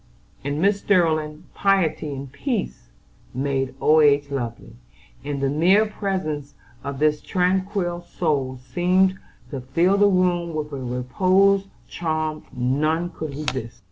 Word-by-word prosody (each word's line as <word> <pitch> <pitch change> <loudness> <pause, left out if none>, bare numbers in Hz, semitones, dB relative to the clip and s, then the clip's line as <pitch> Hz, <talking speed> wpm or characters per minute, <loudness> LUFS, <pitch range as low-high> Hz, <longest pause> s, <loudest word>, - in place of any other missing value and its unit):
In 140 +1 -2
Mrs. 200 +3 +3
Sterling, 155 -6 +1
piety 185 -6 +1
and 135 -1 -6
peace 210 - -3 0.5
made 135 -1 -1
old 155 0 +5
age 145 -1 +3
lovely, 120 -4 -5 0.5
and 145 -1 -3
the - - +3
mere 185 +8 +4
presence 185 -9 -3 0.3
of 140 0 -4
this 150 +1 +2
tranquil 185 -1 0
soul 145 -7 -1
seemed 180 +9 +1 0.3
to 135 - -4
fill 170 +10 +2
the 205 0 +5
room 175 -3 +1
with 150 -1 -3
a - - -3
reposeful 185 +11 +2 0.2
charm 155 -2 -2
none 155 +7 0
could 155 - -5
resist. 130 -6 -4
155 Hz, 130 wpm, -23 LUFS, 140-185 Hz, 0.5 s, old